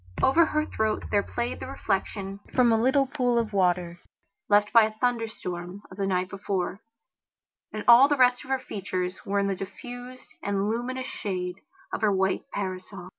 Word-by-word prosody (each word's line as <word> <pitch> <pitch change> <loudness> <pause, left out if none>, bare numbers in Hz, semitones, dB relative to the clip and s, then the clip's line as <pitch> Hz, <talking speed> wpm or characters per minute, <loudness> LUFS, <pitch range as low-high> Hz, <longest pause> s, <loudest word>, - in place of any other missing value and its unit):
Over 320 +5 +5
her 305 0 0
throat 220 -5 -1
there 205 - +4
played 240 +4 -3
the - - -6
reflection 195 -1 -3 0.2
from 245 -2 +5
a 225 0 +3
little 265 +3 +3
pool 250 -3 0
of 225 -2 0
water, 180 -2 +1 0.5
left 205 0 +4
by 230 -2 +8
a 215 - -4
thunderstorm 215 -6 -3
of 185 - -11
the 195 -1 -1
night 180 -1 0
before, 195 0 -3 0.9
and 215 - -5
all 240 +3 +9
the 290 0 +1
rest 250 -1 +4
of 260 - -14
her 265 - +2
features 185 -7 -4
were 200 +1 0
in 200 - +2
the 200 - 0
diffused 245 +6 -9
and 200 0 -1
luminous 250 +3 -2
shade 180 -5 -4 0.4
of - - -2
her 215 -2 +3
white 190 0 0
parasol. 185 -1 -5
210 Hz, 180 wpm, -27 LUFS, 190-245 Hz, 0.9 s, all